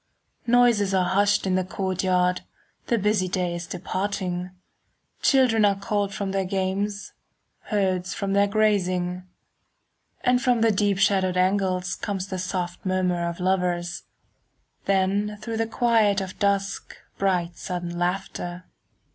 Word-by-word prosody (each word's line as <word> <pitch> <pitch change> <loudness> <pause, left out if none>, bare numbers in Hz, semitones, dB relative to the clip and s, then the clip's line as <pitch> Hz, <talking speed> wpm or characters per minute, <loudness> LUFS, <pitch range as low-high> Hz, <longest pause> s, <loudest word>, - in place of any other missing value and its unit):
Noises 230 -5 +4
are 185 -1 +3
hushed 200 +1 +2
in 190 - +1
the 185 0 +2
courtyard, 185 -1 0
5 - - -27 0.4
The 235 - +2
busy 205 -2 +1
day 180 -1 -1
is 170 0 -5
departing, 185 -1 -3 0.7
Children 250 -5 +4
are 200 -1 +4
called 200 0 -1
from 195 0 -3
their 195 0 0
games,— 195 +2 -2 0.5
Herds 185 -4 0
from 200 -1 -2
their 200 0 +4
grazing. 185 -4 0 1.0
And 250 -1 +2
from 245 -2 +2
the 225 0 +4
deep 205 -1 +1
shadowed 190 -2 +2
angles 185 -1 +1
Comes 195 -3 -3
the 185 - -3
soft 180 -1 -3
murmur 180 -2 0
of 170 - -7
lovers, 180 -2 0 0.9
10 195 +1 +2
Then 210 0 -7
through 225 +2 -5
the 225 0 0
quiet 225 -3 +2
of 190 -1 -6
dusk 200 -1 -1 0.2
Bright 180 -3 0
sudden 175 -1 -4
laughter. 175 0 -3
190 Hz, 140 wpm, -25 LUFS, 180-205 Hz, 1.0 s, Noises